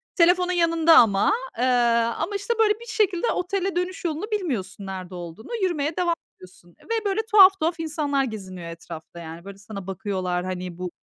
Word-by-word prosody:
Telefonun 360 +1 +4
yanında 330 -2 +4
ama, 200 - +5 0.2
eee. 250 - +1 0.5
Ama, 405 - -3
işte, 400 +4 -1
böyle 425 -1 +5
bir 470 - -11
şekilde 425 -2 0
otele 380 +1 -2
dönüş 360 +1 -3
yolunu 325 +3 -2
bilmiyorsun, 225 - -3
nerede 185 -1 -7
olduğunu. 175 +4 -9
Yürümeye 310 -4 -1
devam 345 -2 +1 0.2
ediyorsun 175 -2 -17
ve, 455 -2 -3
böyle, 405 +2 +1
tuhaf 390 -2 +8
tuhaf 330 +1 -1
insanlar 300 -4 0
geziniyor 190 -7 -6
etrafta, 165 0 -10
yani. 165 +2 -9
Böyle, 200 0 -9
sana 200 -2 -9
bakıyorlar. 185 -2 -2
Hani, 180 -1 -5
bu 180 0 -4
290 Hz, 170 wpm, -24 LUFS, -, 0.5 s, tuhaf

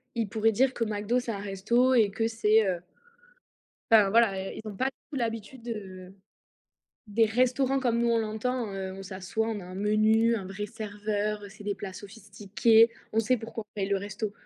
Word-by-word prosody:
ils 225 -3 0
pourraient 225 +1 +2
dire 260 +4 +2
que 235 - -1
McDo, 215 +3 0
c'est 240 -2 -4
un 200 - -4
resto 220 +6 +1
et 220 -5 +4
que 225 +3 -1
c'est, 220 -2 +3
heu 175 -2 -1 1.1
enfin 210 -3 +6
voilà, 220 -4 +4
eh, 190 +3 -5
ils 215 - -7
ont 200 - -8
pas 260 - 0
du 270 - -4
tout 285 - -5
l'habitude, 230 +1 -4
heu, 190 -4 -7 0.9
des 225 +2 +3
restaurants 255 +4 +1
comme 235 -2 +1
nous 235 - +2
on 230 - +3
l'entend, 220 +1 -2
heu, 190 -1 -4
on 195 0 -8
s'assoit, 190 +4 -3
on 215 -3 -3
a - - -10
un 185 +1 -9
menu, 215 +3 +3
un 200 - -5
vrai 200 +2 -5
serveur, 210 -1 -3
c'est 205 +1 -13
des 205 -1 -1
plats 195 -2 -7
sophistiqués, 210 +2 +2 0.2
on 225 - +4
sait 250 +3 +2
pourquoi 225 0 -7
on 210 - -67
paye 195 -2 -2
le 200 - +2
resto. 205 +2 -4
215 Hz, 205 wpm, -28 LUFS, 200-230 Hz, 1.1 s, enfin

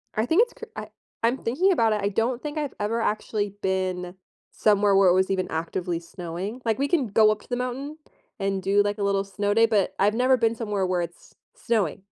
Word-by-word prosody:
I 215 - +1
think 335 - +4
it's 480 - -7
cr 460 - -9
I - - -6 0.4
I'm 240 +3 +2
thinking 340 +12 +1
about 225 -10 +3
it. 210 - -1
I 200 - +2
don't 235 +5 -1
think 300 0 -5
I've 295 -2 -2
ever 220 +3 -1
actually 210 -2 -1
been 185 -1 -2 0.4
somewhere 205 -2 +3
where 195 -1 +5
it - - +5
was 190 +1 +2
even 185 -1 0
actively 170 +1 -2
snowing. 180 +7 -6
Like, 225 +1 0
we 280 - +1
can 315 -6 +1
go 215 +1 +4
up 210 - -3
to - - -18
the 245 - 0
mountain 265 +5 -4 0.4
and 195 -1 -1
do, 200 +2 +3
like, 205 +1 -1
a 205 - -2
little 200 0 +1
snow 205 +1 -1
day, 225 +1 +5
but 205 -4 +1
I've 205 +2 +3
never 255 +2 +4
been 230 -1 +1
somewhere 210 -4 -2
where 180 -1 0
it's 170 0 -9 0.2
snowing. 205 -8 -1
210 Hz, 225 wpm, -25 LUFS, 190-235 Hz, 0.4 s, where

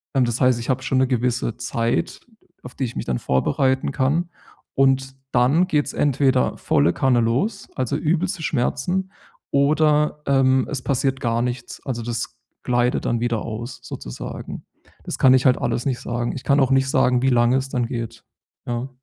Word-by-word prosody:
ähm, 130 - +4
das 120 0 -2
heißt, 125 -2 +4
ich 115 - -6
habe 130 0 0
schon 130 +1 +1
'ne 130 - +3
gewisse 120 -2 -1
Zeit, 120 -1 -2 0.4
auf 125 - -10
die - - -3
ich 120 - -7
mich - - -4
dann 65 -2 -1
vorbereiten 130 - +1
kann. 150 +6 0 0.5
Und 135 0 +2 0.2
dann 135 +9 +3
geht 150 -5 +1
es - - -5
entweder 135 - +2
volle 80 +5 +2
Kanne 130 -2 +2
los, 130 - -1
also, 130 -3 -1
übelste 170 +1 -1
Schmerzen, 175 +8 -1 0.4
oder, 150 +1 +2
ähm, 130 -1 +3
es 135 -3 -3
passiert 135 0 0
gar 115 -1 0
nichts. 125 0 -5
Also, 125 -4 -3
das 120 +1 -4 0.3
gleitet 120 0 +1
dann 120 - 0
wieder 120 -2 -1
aus, 115 +2 -6
sozusagen. - - -7 0.4
Das - - -4
kann 130 - +6
ich 130 -1 +3
halt 130 -2 +5
alles 120 - -1
nicht 130 -3 -1
sagen. 120 0 -3
Ich 130 - -7
kann 140 0 +3
auch 135 0 +2
nicht 135 0 +3
sagen, 125 -2 +3
wie 135 - +3
lange 120 0 +3
es 135 0 -3
dann 120 -3 -1
geht. 115 -2 -6 0.4
Ja. 120 +2 -3
130 Hz, 185 wpm, -22 LUFS, 120-135 Hz, 0.5 s, kann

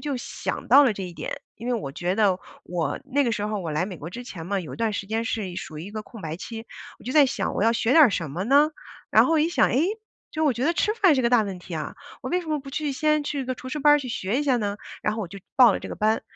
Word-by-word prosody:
就 285 -4 -3
想 - - -5
到 285 0 +8
了 245 - +3
这 200 - -6
一 180 -2 -6
点， - - -5 0.2
因 230 - -8
为 250 - +1
我 195 -12 -3
觉 175 +6 -2
得 200 -3 +3 0.2
我 165 -5 -3
那 280 0 +1
个 235 - +1
时 205 -1 -2
候 210 -1 -2
我 165 -5 -4
来 155 +4 +1
美 185 -3 -6
国 165 +3 -8
之 245 +5 -7
前 170 -8 -8
嘛， 200 0 -1
有 165 - -7
一 - - -11
段 225 -2 0
时 200 -1 -4
间 225 +1 -1
是 215 -4 -2
一 175 - -8
属 155 -4 -6
于 160 - -6
一 - - -8
个 215 0 -5
空 225 -2 -12
白 160 0 -4
期， 225 +4 -7 0.4
我 - - -15
就 255 - -3
在 295 -3 +6
想 - - -2
我 200 - 0
要 230 - +4
学 230 0 0
点 315 +3 +8
儿 245 - +4
什 165 -6 -2
么 175 +7 -3
呢？ 285 +5 +5 0.4
然 - - +6
后 330 - +1
我 315 - +4
一 320 - +2
想， 345 - +3
诶， 280 +6 +2 0.5
就 315 0 -1
我 290 - +4
觉 240 +2 -2
得 335 - +3
吃 425 +5 +1
饭 375 -10 +4
是 260 - +2
个 235 - +2
大 245 -3 +5
问 195 -3 -5
题 180 -1 -8
啊， 155 - -5 0.3
我 - - -4
为 360 - +1
什 345 - -11
么 305 -2 -1
不 275 0 -10
去 295 0 -2
先 305 +2 +1
去 280 -3 -2
个 255 0 -3
厨 255 - -8
师 300 +3 -4
班 295 +1 +7
儿 - - +4
去 260 -3 -6
学 215 +1 -1
一 295 - -1
下 265 -3 +3
呢？ 205 -3 -2 0.3
然 210 +1 0
后 225 - -3
我 200 - -3
就 195 +3 -10 0.2
报 255 -2 +8
了 - - -3
这 - - -7
个 - - -6
班， 220 +1 +1
230 Hz, 350 characters per minute, -25 LUFS, 195-280 Hz, 0.5 s, 到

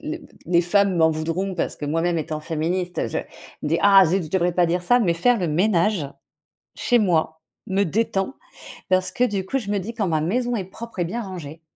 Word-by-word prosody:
les 315 +2 -5 0.2
les 170 0 +3
femmes 195 +2 +2
m'en 160 -1 +5
voudront 165 +5 -2
parce 175 - -2
que - - -6
moi-même 165 +3 0
étant 155 0 -4
féministe 170 +2 -2
je 115 - -2 0.4
des 155 +2 0
ah 195 -1 +7
zut 180 +2 0
je - - -8
devrais 180 +1 +1
pas 175 0 +3
dire 175 +2 -1
ça 245 +7 +4
mais 185 -8 +2
faire 235 +8 +3
le 180 - -1
ménage 175 0 +1 0.7
chez 245 - +2
moi 160 -5 0 0.2
me 195 +1 +1
détend 195 - -1 0.6
parce 185 0 +3
que 250 - +1
du 200 -5 -2
coup 270 - -2
je 220 -7 -3
me 205 - +1
dis 220 +5 -6
quand 215 -4 -1
ma 160 -3 +1
maison 240 +10 0
est 200 -5 -2
propre 230 +4 -10
et 175 - +1
bien 235 +8 -4
rangé 165 -6 -8
180 Hz, 215 wpm, -23 LUFS, 165-205 Hz, 0.7 s, ah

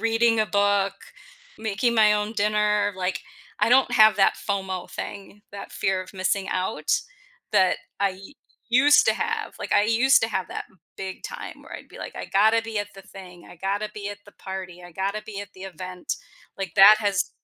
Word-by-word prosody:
reading 225 0 +2
a 215 - +1
book, 200 0 +1 0.6
making 220 +2 0
my 215 -1 +5
own 210 +1 -1
dinner, 210 -1 +1
like, 185 0 -2 0.4
I - - +3
don't 250 0 +4
have 215 -3 +6
that 195 - +4
FOMO 190 -2 -3
thing, 200 +1 -8
that 200 - -9
fear 190 -1 -1
of 185 - -14
missing 190 +1 -1
out 185 +4 -2 0.6
that 185 -1 +4 0.2
I 200 -1 +3
u 190 +8 -12 0.4
used 270 +5 +5
to - - +4
have, - - -3
like, - - -3
I 205 - +4
used 240 +5 +4
to 225 - +1
have 190 -4 -3
that - - -5 0.3
big 190 -1 -6
time - - -8
where - - -14
I'd - - -12
be - - -13
like, - - -8
"I - - -5
gotta 220 +3 +4
be 225 -2 -4
at 205 - -3
the 195 - -12
thing, 180 -2 -13
I - - -12
gotta 200 +4 -2
be 205 -1 -5
at 205 - -8
the 205 - -15
party, 185 -2 -8
I 175 - -11
gotta 200 +4 -3
be 205 -2 -7
at 205 -1 -10
the 185 - -12
event." 185 -1 -6 0.4
Like, 190 -4 -4
that 205 +2 +9
has 205 -2 0
200 Hz, 200 wpm, -24 LUFS, 190-215 Hz, 0.6 s, that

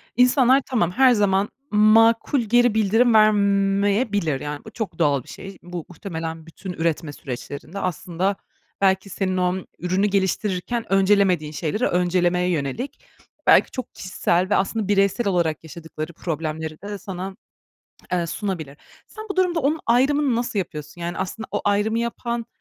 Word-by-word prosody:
insanlar 250 +2 +5
tamam 215 -9 0
her 255 +5 +5
zaman 200 -2 +2 0.2
makul 225 +5 +4
geri 240 +1 +3
bildirim 225 +3 +3
vermeyebilir, 200 - +2
yani, 145 0 -6
bu - - -10
çok 215 -6 -5
doğal 140 -5 +2
bir - - -17
şey. 195 -1 -9
Bu 175 -2 -6
muhtemelen 165 -2 -6
bütün 180 +3 -8
üretme 165 -2 -2
süreçlerinde 140 +8 -7
aslında, 185 +2 -1 0.5
belki, 190 0 +2
senin 185 0 -2
o 180 0 +1 0.2
ürünü 185 +4 +1
geliştirirken 200 +3 -1
öncelemediğin 190 -5 +3
şeyleri 165 +9 -1
öncelemeye 180 0 +1
yönelik, 180 - -3 0.4
belki, - - +6
çok 255 - -6
kişisel 185 0 0
ve - - +3
aslında 200 +1 0
bireysel 200 +3 +2
olarak 170 -5 0
yaşadıkları 160 0 -8
problemleri 160 -1 -4
de 205 +1 -5
sana, 190 0 -6 0.8
eee, 175 -2 +1
sunabilir. 165 -7 -4 0.3
Sen 435 0 -10
bu 395 - -3
durumda 355 -3 +2
onun 300 +3 0
ayrımını 265 +2 +3
nasıl 235 -3 -2
yapıyorsun? 150 -2 -6
Yani, 170 0 -4
aslında, 220 +4 -4
o 205 - -1
ayrımı 205 +2 +1
yapan, 235 0 -3
195 Hz, 145 wpm, -23 LUFS, 170-220 Hz, 0.8 s, belki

